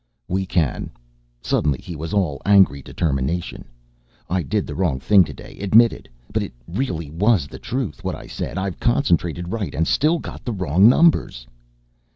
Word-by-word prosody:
"We 95 +1 -1
can." 85 -8 -1 0.5
Suddenly 75 -3 +1
he 85 - -9
was 80 +2 -6
all 90 -9 0
angry 95 -9 +4
determination. 75 +3 -2 0.7
"I 95 0 +1
did 70 - -1
the - - -6
wrong 85 -8 0
thing 100 +6 +5
today, 70 -5 -10
admitted, 110 +4 +3 0.2
but - - +1
it - - -5
really 85 - -3
was 95 0 +2
the - - -11
truth, 125 -2 -4
what - - -2
I - - -10
said. - - -5
I've 95 -1 -3
concentrated 85 - 0
right 110 -4 -3
and 80 - +1
still 155 +4 +2
got - - -8 0.2
wrong 95 +5 +5
numbers!" 135 - +3
90 Hz, 160 wpm, -21 LUFS, 80-105 Hz, 0.7 s, thing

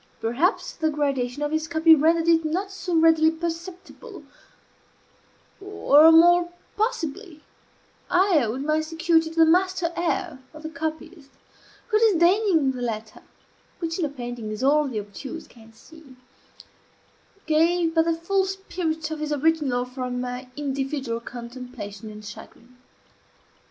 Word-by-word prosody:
Perhaps 270 - 0
the 315 - 0
gradation 280 -3 -2
of 295 - -2
his 315 0 -1
copy 320 0 +5
rendered 325 +2 +3
it 330 -1 +4
not 365 +6 -2
so 365 -2 -4
readily 320 -1 +5
perceptible; 340 +4 -7 1.4
or, 325 -6 +5
more 345 +2 +6 0.3
possibly, 385 - -3 0.7
I 360 -5 +3
owed 235 +4 -3
my 305 +1 +1
security 325 0 +1
to 325 - -12
the 325 -1 +6
masterly 360 0 +2
air 340 -3 -2 0.2
of 310 - -11
the 315 - -5
copyist, 315 0 -6 0.6
who, 430 -1 +3
disdaining 365 -6 +3
the 250 -1 -7
letter 220 -2 -5 0.6
(which 330 0 -4
in 340 - +1
a - - -3
painting 245 -5 -7
is 215 +3 -5
all 295 +2 +3
the 235 -5 -3
obtuse 235 +10 -8
can 225 -1 -18
see) 275 +4 -17 1.3
gave 330 +2 +2
but 325 0 +3
the 335 -1 +1
full 380 +4 0
spirit 340 -5 -4
of 315 - -4
his 305 0 -4
original 290 -4 +1
for 250 0 -6
my 250 +1 -5
individual 270 -4 -3
contemplation 235 -3 -9
and 210 0 -11
chagrin. 235 +4 -12
315 Hz, 135 wpm, -24 LUFS, 260-335 Hz, 1.4 s, more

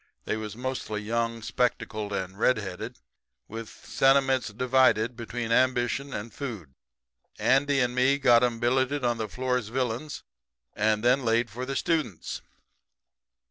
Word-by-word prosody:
They - - -1
was 110 -1 -5
mostly 120 -4 -4
young, 115 +1 -1
spectacled, 110 -3 -1
and 95 -1 -3
red 125 +2 +4
headed, 105 +4 -6 0.5
with 115 0 -7
sentiments 135 -1 +2
divided 125 0 +2
between 115 0 -4
ambition 130 +2 +1
and 110 -1 -6
food. 110 - -6 0.6
Andy 140 +1 +3
and 125 -1 +1
me 130 +2 +3
got 120 -3 +5
'em 120 -2 0
billeted 130 +3 +1
on 120 -1 +1
the 110 - -2
Floresvillians 125 +3 -2 0.5
and 105 +1 +1
then 125 +2 +3
laid 115 0 +1
for 125 +3 -5
the 135 - -3
students. 155 - -1
120 Hz, 135 wpm, -27 LUFS, 110-130 Hz, 0.6 s, got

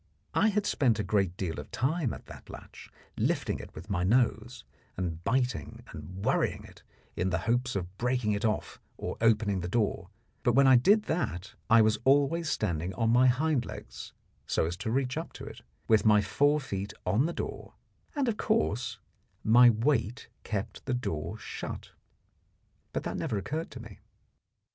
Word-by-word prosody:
I - - +4
had 210 0 0
spent 125 - +2
a 105 - -1
great 95 -2 0
deal 85 -6 -3
of 75 - -9
time 135 0 0
at - - -9
that - - -12
latch, - - -11 0.3
lifting - - 0
it - - -11
with 80 +5 -9
my 95 -4 -1
nose, 120 +2 +1 0.3
and 85 -3 -3
biting 125 -1 -1
and 90 +6 -8
worrying - - +1
it, - - -15 0.3
in 90 +2 0
the 95 - +1
hopes 120 +1 0
of 90 -1 -4
breaking 125 -3 +1
it 100 0 -1
off 110 -1 -1 0.2
or - - -4
opening 105 -3 +3
the 90 - -3
door; 100 -3 -1 0.3
but 120 - +2
when 135 +3 +5
I 130 -1 +7
did 205 - +5
that 110 - -3 0.2
I 115 -1 +7
was 110 0 +2
always 145 +4 +3
standing 90 - -1
on 115 +2 +1
my 125 +2 +5
hind 135 +1 +2
legs, 60 - -9 0.4
so - - +1
as 85 +2 -3
to 110 - -4
reach 130 +3 0
up 165 - -5
to - - -9
it, - - -10 0.3
with 110 -2 +4
my 105 -1 +6
fore 145 +8 +2
feet 100 -8 -5
on 105 - +2
the - - -2
door, - - -6 0.4
and, 280 -3 0
of 225 -3 0
course, 130 - 0 0.5
my 120 +2 +7
weight 120 +1 0
kept 105 -2 -4
the 130 - +1
door 85 - -3
shut. - - -7 1.0
But - - -3
that - - -3
never 105 - -2
occurred 155 - -3
to 125 - -9
me. 110 -4 -11
115 Hz, 180 wpm, -29 LUFS, 95-130 Hz, 1.0 s, I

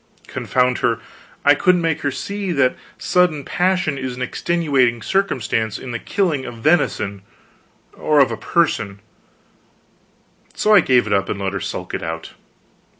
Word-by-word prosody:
Confound 125 -1 0
her, 115 -1 +1 0.5
I 145 - +8
couldn't 180 +3 +2
make 160 -1 0
her 145 - 0
see 200 +6 -4
that 130 -4 +2 0.2
sudden 175 -5 +1
passion 180 -6 0
is 130 -2 -4
an 125 - -4
extenuating 130 -6 0
circumstance 115 - 0
in 130 - -7
the 120 - -3
killing 165 - -1
of 120 - -7
venison 115 - +1 0.7
or 150 -1 +1
of 140 - +4
a - - -2
person 105 - 0 1.6
so 215 - +3
I 205 - +9
gave 130 -7 +3
it 105 - -1
up 95 -1 +1
and 100 - -3
let 95 -1 -2
her 100 - -2
sulk - - -5
it - - -2
out. 80 0 -5
135 Hz, 155 wpm, -20 LUFS, 115-170 Hz, 1.6 s, I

